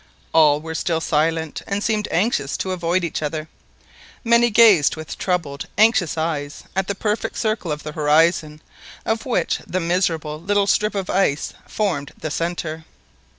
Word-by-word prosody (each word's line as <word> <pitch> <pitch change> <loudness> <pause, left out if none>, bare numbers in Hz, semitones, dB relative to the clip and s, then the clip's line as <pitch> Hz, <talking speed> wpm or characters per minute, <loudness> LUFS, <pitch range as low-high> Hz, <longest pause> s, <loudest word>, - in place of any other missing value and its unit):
All 150 -2 +5
were 160 0 -6
still 160 +1 -1
silent, 160 0 0
and 200 +1 -2
seemed 215 -2 0
anxious 175 - 0
to 190 - -3
avoid 175 0 0
each 170 - -3
other. 155 +1 -3 0.8
Many 235 0 +4
gazed 210 -9 +5
with 155 -1 -7
troubled 165 -7 -2
anxious 215 -6 +3
eyes 150 -3 -3
at 190 0 0
the 200 - -2
perfect 210 +2 -2
circle 215 -7 -1
of 150 0 -4
the 150 - -5
horizon, 155 0 +2 0.4
of 225 +3 -1
which 185 -9 0
the 185 - -1
miserable 165 -3 -1
little 205 +2 +1
strip 210 +1 +1
of 195 -2 -2
ice 170 -6 +1
formed 165 -10 -2
the 155 - -5
centre. 165 -1 -3
170 Hz, 155 wpm, -21 LUFS, 155-200 Hz, 0.8 s, All